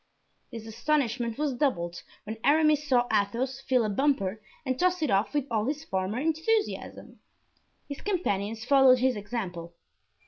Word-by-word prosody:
This 230 -3 -8
astonishment 240 -1 -1
was 295 -2 -1
doubled 175 - -1 0.2
when 220 +1 -7
Aramis 300 0 +3
saw 245 -3 +3
Athos 240 +6 0
fill 255 -4 +1
a - - -1
bumper 220 -5 0 0.2
and 260 -1 -2
toss 360 -2 +1
it 300 - 0
off 195 +2 +2
with 290 -3 +1
all 220 -2 0
his 300 +2 -3
former 190 +1 -2
enthusiasm. 325 +9 -2 0.7
His 285 - -7
companions 225 - -2
followed 270 -1 +6
his 255 0 +1
example. 190 -6 -5
250 Hz, 145 wpm, -27 LUFS, 215-290 Hz, 0.7 s, followed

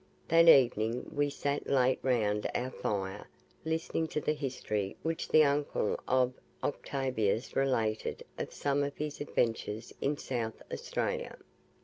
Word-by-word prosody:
That 165 +1 +6
evening 120 -4 +4
we 145 -1 +1
sat 145 0 -2
late 130 -1 +3
round 105 -5 +1
our 130 +1 -1
fire 95 -5 -3 0.4
listening 160 0 -1
to 155 - -2
the 150 - 0
history 125 -9 -3
which 165 +1 -2
the 155 - +7
uncle 140 -6 +1
of 130 0 +3 0.3
Octavius 130 -6 -1
related 115 -5 0
of - - -4
some 145 0 0
of 140 0 -2
his 150 -1 -4
adventures 115 -5 -1
in 145 +1 +1
South 115 -5 -3
Australia. - - -2
130 Hz, 130 wpm, -31 LUFS, 115-145 Hz, 0.4 s, the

